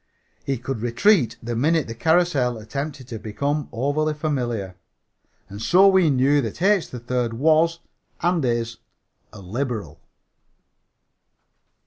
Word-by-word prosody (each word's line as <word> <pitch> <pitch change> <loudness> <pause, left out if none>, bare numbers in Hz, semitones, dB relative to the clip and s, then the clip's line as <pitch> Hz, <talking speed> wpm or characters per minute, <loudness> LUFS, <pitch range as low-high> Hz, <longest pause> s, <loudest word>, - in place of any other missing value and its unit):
He 135 -1 -2
could 125 -1 -5
retreat 120 - +2
the 120 0 -3
minute 155 +6 +2
the 115 - -6
carrousel 150 -3 +1
attempted 135 +4 -6
to 115 -3 -6
become 140 +8 -2
overly 145 +5 -1
familiar. 120 - -3 0.7
And 100 +2 -9
so 185 +9 +5
we 190 -4 +4
knew 140 +2 +3
that 115 0 -5
H. 195 0 +2
3rd 125 -1 -3
was 160 +6 +2 0.4
and 175 -2 +1
is 115 -1 -1 0.5
a 105 - -12
liberal. 105 - -4
130 Hz, 120 wpm, -23 LUFS, 115-155 Hz, 0.7 s, so